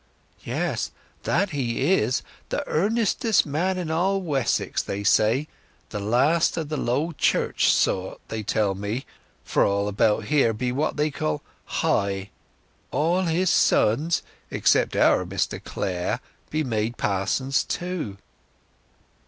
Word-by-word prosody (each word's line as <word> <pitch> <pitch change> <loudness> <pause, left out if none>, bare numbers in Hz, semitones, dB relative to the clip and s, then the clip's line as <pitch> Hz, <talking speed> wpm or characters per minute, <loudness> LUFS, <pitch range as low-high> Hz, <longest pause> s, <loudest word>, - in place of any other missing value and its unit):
"Yes—that 200 -1 -2
he 135 +3 +1
is—the 125 - -2
earnestest 220 +4 +2
man 170 +6 0
in 170 -3 -3
all 190 +4 +1
Wessex, 145 -9 0
they 100 +1 -4
say—the 110 0 0
last 135 +13 +2
of 160 -3 -3
the 155 - -2
old - - -2
Low 145 +8 +1
Church 145 - +1
sort, 95 0 0
they 110 - -4
tell 105 -1 +1
me—for 105 +6 -3
all 100 0 +1
about 105 +1 +2
here 140 -7 +3
be 125 +3 -2
what 140 +5 -1
they 150 +1 +1
call 75 - -2 0.2
High. 100 0 0 0.6
All 165 +7 +1
his 170 +2 +2
sons, 150 +10 +3 0.3
except - - +2
our - - +4
Mr 95 +1 -2
Clare, 90 -1 -2 0.3
be 155 0 0
made 115 -2 -1
pa'sons 105 +8 0
too." 175 - -4
130 Hz, 120 wpm, -25 LUFS, 105-165 Hz, 0.6 s, our